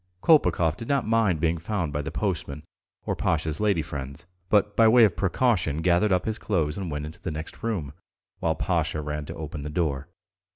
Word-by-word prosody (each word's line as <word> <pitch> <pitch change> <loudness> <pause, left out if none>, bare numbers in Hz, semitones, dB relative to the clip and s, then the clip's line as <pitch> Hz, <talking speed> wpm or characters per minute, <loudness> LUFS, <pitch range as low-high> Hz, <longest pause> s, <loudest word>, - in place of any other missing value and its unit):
Kolpakov 90 - +4
did 115 - -7
not 140 -2 +1
mind 110 -7 +2
being 85 +1 +1
found 85 -3 -2
by 75 - -1
the 75 - -5
postman 75 -4 -3 0.4
or - - -1
Pasha's 80 -1 -1
lady 100 -7 +2
friends, 70 +1 -7 0.2
but 105 0 +3
by 115 - +6
way 120 +1 +7
of 105 -6 +4
precaution 90 - +1
gathered 90 +4 +3
up 90 -1 +2
his 110 0 -2
clothes 80 -7 0
and 95 -3 -4
went 75 -1 -3
into 80 +3 -10
the - - -3
next 80 0 -7
room, 95 - -3 0.5
while 80 -1 0
Pasha 80 -3 -1
ran 75 0 -4
to - - -7
open 75 -1 -6
the 75 - -5
door. 75 -3 -1
85 Hz, 200 wpm, -26 LUFS, 75-105 Hz, 0.5 s, way